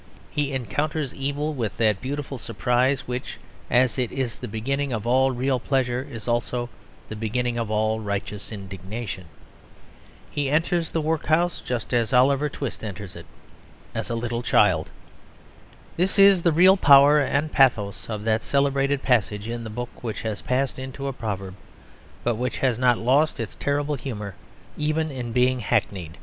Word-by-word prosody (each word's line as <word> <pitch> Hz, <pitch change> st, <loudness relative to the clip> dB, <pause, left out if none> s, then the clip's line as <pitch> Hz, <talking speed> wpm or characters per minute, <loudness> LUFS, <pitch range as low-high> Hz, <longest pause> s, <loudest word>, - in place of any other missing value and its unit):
He 145 Hz, -1 st, -1 dB
encounters 140 Hz, +4 st, -2 dB
evil 145 Hz, +3 st, -2 dB
with 115 Hz, -7 st, -3 dB
that 110 Hz, -4 st, +2 dB
beautiful 135 Hz, 0 st, -4 dB
surprise 125 Hz, +3 st, +1 dB
which, 125 Hz, +1 st, -4 dB, 0.3 s
as 130 Hz, +1 st, +3 dB
it 125 Hz, -2 st, -1 dB
is 130 Hz, -4 st, -3 dB
the -, -, -5 dB
beginning 135 Hz, +6 st, -2 dB
of 110 Hz, -3 st, -3 dB
all 130 Hz, +2 st, +4 dB
real 130 Hz, +1 st, 0 dB
pleasure, 125 Hz, -1 st, 0 dB
is 115 Hz, -3 st, -7 dB
also 120 Hz, 0 st, -1 dB, 0.4 s
the 110 Hz, -, -6 dB
beginning 120 Hz, +2 st, -1 dB
of 115 Hz, -2 st, -2 dB
all 110 Hz, +1 st, +1 dB
righteous 105 Hz, 0 st, -4 dB
indignation. 95 Hz, 0 st, -6 dB, 1.1 s
He 145 Hz, -2 st, -1 dB
enters 165 Hz, +3 st, +1 dB
the 165 Hz, -, -1 dB
workhouse 160 Hz, +2 st, +1 dB
just 125 Hz, 0 st, -4 dB
as 120 Hz, 0 st, +1 dB
Oliver 140 Hz, +3 st, +4 dB
Twist 140 Hz, -4 st, -5 dB
enters 100 Hz, -2 st, -6 dB
it, -, -, -10 dB, 0.7 s
as -, -, -3 dB
a 120 Hz, -, -1 dB
little 120 Hz, 0 st, -2 dB
child. -, -, +3 dB, 1.1 s
This 185 Hz, +4 st, +1 dB
is 195 Hz, -2 st, +7 dB
the 170 Hz, -, +3 dB
real 185 Hz, +5 st, +6 dB
power 145 Hz, -2 st, +7 dB
and 145 Hz, +2 st, 0 dB
pathos 115 Hz, -8 st, +2 dB
of 105 Hz, -2 st, -4 dB
that 110 Hz, 0 st, +1 dB
celebrated 140 Hz, +1 st, +1 dB
passage 105 Hz, -4 st, +1 dB
in 120 Hz, 0 st, -4 dB
the 110 Hz, -, -6 dB
book 120 Hz, +3 st, -7 dB
which 115 Hz, -3 st, -4 dB
has 110 Hz, -2 st, -3 dB
passed 130 Hz, +1 st, -1 dB
into 130 Hz, +1 st, -6 dB
a 135 Hz, -, -2 dB
proverb; 100 Hz, -6 st, -4 dB, 0.7 s
but 120 Hz, -2 st, 0 dB
which 125 Hz, +2 st, -2 dB
has 125 Hz, -3 st, +1 dB
not 125 Hz, -2 st, +4 dB
lost 140 Hz, +6 st, +2 dB
its 115 Hz, -2 st, -4 dB
terrible 145 Hz, +1 st, -1 dB
humour 110 Hz, -8 st, -5 dB, 0.4 s
even 155 Hz, +1 st, 0 dB
in 125 Hz, -3 st, -5 dB
being 125 Hz, +1 st, +2 dB
hackneyed. 90 Hz, -6 st, -1 dB
125 Hz, 160 wpm, -24 LUFS, 115-140 Hz, 1.1 s, is